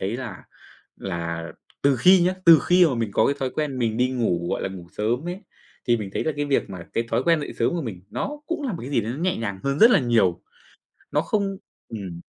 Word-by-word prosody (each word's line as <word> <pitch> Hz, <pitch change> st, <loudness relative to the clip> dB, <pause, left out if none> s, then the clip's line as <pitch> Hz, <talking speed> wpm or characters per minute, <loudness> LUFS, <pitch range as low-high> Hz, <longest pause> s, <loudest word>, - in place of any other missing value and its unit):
thấy 100 Hz, +5 st, -2 dB
là 125 Hz, -3 st, -7 dB, 0.5 s
là 85 Hz, -3 st, -4 dB, 0.4 s
từ 140 Hz, -2 st, +4 dB
khi 180 Hz, +8 st, +6 dB
nhá, 185 Hz, +1 st, +2 dB
từ 165 Hz, -2 st, +9 dB
khi 180 Hz, 0 st, +6 dB
mà 135 Hz, -, 0 dB
mình 115 Hz, -3 st, -2 dB
có -, -, +3 dB
cái 140 Hz, -, +1 dB
thói 130 Hz, -, -1 dB
quen 140 Hz, -2 st, -3 dB
mình 115 Hz, -2 st, 0 dB
đi 125 Hz, +1 st, +2 dB
ngủ, 90 Hz, -9 st, -1 dB
gọi -, -, -2 dB
là, -, -, -1 dB
ngủ 90 Hz, -3 st, -9 dB
sớm 120 Hz, +10 st, -1 dB
ấy, 180 Hz, +3 st, -5 dB, 0.5 s
thì 120 Hz, -1 st, +4 dB
mình 100 Hz, -3 st, -5 dB
thấy -, -, -1 dB
là 155 Hz, -, 0 dB
cái 145 Hz, -, -1 dB
việc 140 Hz, -7 st, 0 dB
mà 90 Hz, -3 st, -7 dB
cái 115 Hz, -, 0 dB
thói -, -, +1 dB
quen 165 Hz, -2 st, +3 dB
dậy 145 Hz, -, -5 dB
sớm -, -, +2 dB
của 170 Hz, -2 st, -2 dB
mình 95 Hz, -8 st, -6 dB
nó -, -, -3 dB, 0.2 s
cũng 335 Hz, -2 st, -3 dB
là 260 Hz, -6 st, -2 dB
một 170 Hz, -, -5 dB
cái 135 Hz, -, -6 dB
gì 125 Hz, -, +2 dB
đấy 110 Hz, +2 st, -4 dB
nó 135 Hz, -, -6 dB
nhẹ 180 Hz, +2 st, 0 dB
nhàng 100 Hz, -4 st, -4 dB
hơn 140 Hz, +2 st, 0 dB
rất 230 Hz, +2 st, +8 dB
là 245 Hz, -, +5 dB
nhiều, 115 Hz, -8 st, +2 dB, 0.7 s
nó -, -, +2 dB
không 195 Hz, -2 st, -1 dB, 0.3 s
ừm. 95 Hz, -6 st, -7 dB
125 Hz, 260 wpm, -24 LUFS, 100-165 Hz, 0.7 s, từ